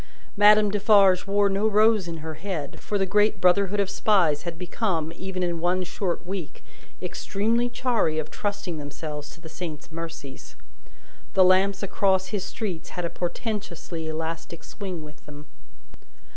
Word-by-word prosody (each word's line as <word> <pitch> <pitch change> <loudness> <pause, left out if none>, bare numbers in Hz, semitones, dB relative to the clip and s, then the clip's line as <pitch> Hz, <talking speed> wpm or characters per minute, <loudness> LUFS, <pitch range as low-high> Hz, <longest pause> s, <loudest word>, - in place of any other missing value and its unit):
Madame 210 0 +6
Defarge 200 -3 +5
wore 200 +1 +3
no 200 +2 +1
rose 215 -2 +4
in 165 -1 -5
her 160 - -4
head, 160 -5 -5
for 205 - -2
the 195 - +1
great 210 +1 +2
brotherhood 195 +3 +3
of 200 - +2
Spies 190 -6 +2
had 170 -2 -6
become, 175 -3 -2
even 185 0 -4
in 170 -1 -1
one 180 +2 +1
short 180 0 -3
week, 185 -3 -6 0.4
extremely 230 +4 0
chary 235 -11 0
of 155 -1 -3
trusting 205 -5 -3
themselves 150 0 -6
to - - -13
the 165 - -10
saint's 160 -2 -7
mercies. 165 -4 -8 0.8
The 190 - +7
lamps 190 +2 +4
across 190 -1 +1
his 205 -4 -2
streets 190 -4 -5
had 175 - -1
a 170 - -3
portentously 175 -4 -4
elastic 160 +1 -5
swing 185 -6 -6
with 150 0 -13
them. 145 0 -11
185 Hz, 155 wpm, -25 LUFS, 165-205 Hz, 0.8 s, The